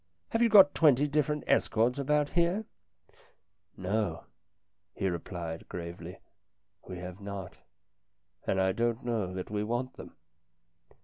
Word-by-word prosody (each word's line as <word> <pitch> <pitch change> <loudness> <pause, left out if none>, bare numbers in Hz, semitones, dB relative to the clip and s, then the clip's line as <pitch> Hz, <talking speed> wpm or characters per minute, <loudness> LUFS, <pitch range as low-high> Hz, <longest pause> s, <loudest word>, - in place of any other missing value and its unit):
" 85 - -47
Have 225 - +1
you 235 - +5
got 195 -2 +8
twenty 145 -2 +4
different 150 0 0
Estcourts 115 +5 +2
about 150 +1 +1
here? 175 +5 +1 0.6
" - - -37
"No," 95 -2 -1 0.7
he 95 - -1
replied 85 -1 -5
gravely, 85 +1 -7 0.7
"we 95 - -6
have 90 +2 -8
not, 95 -4 -7 0.9
and 95 - +1
I 95 0 +3
don't 120 +3 -1
know 110 -6 -1
that 95 +1 -6
we 105 0 -1
want 120 +4 -3
them." - - -11
110 Hz, 135 wpm, -30 LUFS, 90-145 Hz, 0.9 s, got